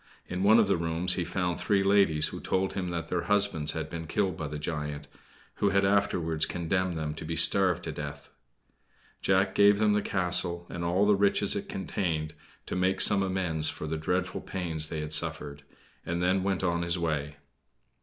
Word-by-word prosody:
In 90 0 -4
one 105 +3 +6
of 110 -3 +4
the 100 - +2
rooms 85 +2 +1
he 90 - -1
found 90 -1 -2
three 100 -2 +1
ladies 95 -6 +3
who - - -7
told 95 +1 -1
him 90 -2 -3
that 85 -2 -4
their 90 - -1
husbands 100 -7 +2
had - - -4
been 80 -1 -7
killed 95 -1 -1
by 80 -1 -5
the 75 +1 -5
giant, 75 -2 -5 0.5
who 100 - +2
had 100 0 +2
afterwards 85 -6 +1
condemned 90 0 -2
them 75 -1 -3
to 80 - -8
be 80 +1 -4
starved 90 -1 +4
to - - -4
death. 75 -1 -8 0.9
Jack 95 0 +2
gave 100 +1 +5
them 105 0 +2
the 105 - +1
castle 90 -2 -2
and 85 - -5
all 90 +4 +2
the 105 - +4
riches 100 0 +2
it 100 - -5
contained 80 -5 -3 0.3
to - - -5
make 95 +1 +1
some 100 -1 +6
amends 90 -5 -1
for - - -6
the 80 +1 -3
dreadful 90 +3 -2
pains 80 -5 -2
they 80 -2 -4
had 75 0 -4
suffered, 75 -3 0 0.4
and 85 +1 -3
then 90 +2 +1
went 95 0 -1
on 85 -2 0
his 85 +1 -1
way. 75 -3 -2
90 Hz, 195 wpm, -28 LUFS, 80-95 Hz, 0.9 s, one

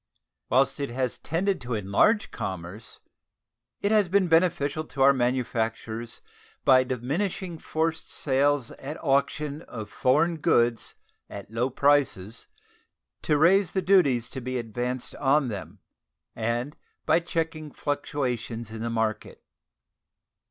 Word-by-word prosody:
Whilst 135 +3 +3
it 140 - -2
has 125 0 -2
tended 185 +2 -1
to 120 -1 -3
enlarge 105 - +2
commerce, 95 +4 -6 0.8
it 200 - +1
has 210 -4 +4
been 195 0 +3
beneficial 165 -3 +2
to 140 -3 -1
our 140 +1 +7
manufactures 115 -2 -2 0.4
by 130 -1 +6
diminishing 165 - -3
forced 160 +1 -2
sales 140 -2 +1
at 145 +3 -7
auction 140 +2 0
of 110 -9 -8
foreign 160 +6 +2
goods 120 -6 +2 0.3
at 100 +1 -9
low 120 +3 0
prices 130 -7 +1 0.7
to 150 - +2
raise 180 +4 +4
the 190 - +1
duties 145 -11 +4
to 130 - -5
be 130 +1 -3
advanced 120 +2 -3
on 140 -1 +2
them, 100 -4 -7 0.6
and 120 +5 -2 0.3
by - - +4
checking 165 -2 -3
fluctuations 125 -6 -3
in 110 0 -6
the 115 - -2
market. 110 -2 -2
135 Hz, 125 wpm, -26 LUFS, 115-155 Hz, 0.8 s, our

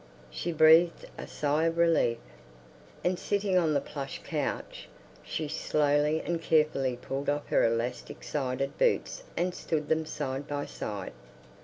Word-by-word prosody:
She 175 - -3
breathed 160 +2 +5
a - - -7
sigh 150 +2 0
of 165 0 0
relief, 165 -8 +3 0.9
and 180 0 +1
sitting 200 -2 0
on 165 -4 +3
the - - +4
plush 140 -1 -6
couch, - - -4 0.3
she 150 - -4
slowly 150 +1 +1
and 170 -1 -1
carefully 150 -6 +2
pulled 135 +3 -3
off 145 0 -2
her - - +3
elastic 115 +2 -2
sided 135 -1 -2
boots - - +1 0.2
and 180 +1 0
stood 155 -4 -3
them 160 0 +1
side 140 -2 -4
by 145 0 -3
side. 100 -8 -6
150 Hz, 145 wpm, -29 LUFS, 135-165 Hz, 0.9 s, breathed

